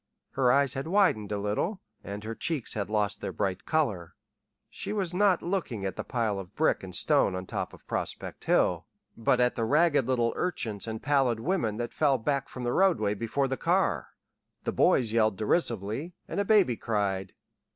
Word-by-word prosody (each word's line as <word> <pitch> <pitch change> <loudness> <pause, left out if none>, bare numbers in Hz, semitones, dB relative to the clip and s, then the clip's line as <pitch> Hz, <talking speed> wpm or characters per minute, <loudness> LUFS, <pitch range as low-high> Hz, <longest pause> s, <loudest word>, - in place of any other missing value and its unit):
Her 130 -2 +3
eyes 140 -1 +3
had 135 +3 -4
widened 165 - +2
a 105 - 0
little, 105 - -1 0.2
and 100 +1 -6
her 110 +1 -4
cheeks 145 +1 -2
had 100 -1 -3
lost 105 -1 0
their - - -3
bright 95 -3 -3
color. 100 - 0 0.5
She - - -5
was 190 -5 -2
not 190 -1 +3
looking 165 - -2
at 95 - -3
the - - -4
pile 110 -5 -1
of 90 -2 -10
brick - - +2
and - - -7
stone 95 - +3
on 95 0 -4
top - - -4
of - - -16
Prospect - - -5
Hill, - - +2 0.3
but 115 +2 +2
at 125 0 +3
the 115 - -2
ragged 145 +1 +3
little 120 -3 +1
urchins 115 - -2
and 110 0 -5
pallid 135 -5 +2
women 115 - -1
that 120 0 -4
fell 145 -3 +3
back 140 +3 -1
from 125 - -7
the 120 0 0
roadway 140 - +3
before 115 +6 -1
the 130 0 -2
car. - - 0 0.5
The - - -1
boys 115 -4 +3
yelled 110 -4 +2
derisively, 115 - 0
and - - -3
a 200 - +1
baby 195 - +4
cried. 100 -4 -2
120 Hz, 190 wpm, -28 LUFS, 105-150 Hz, 0.5 s, baby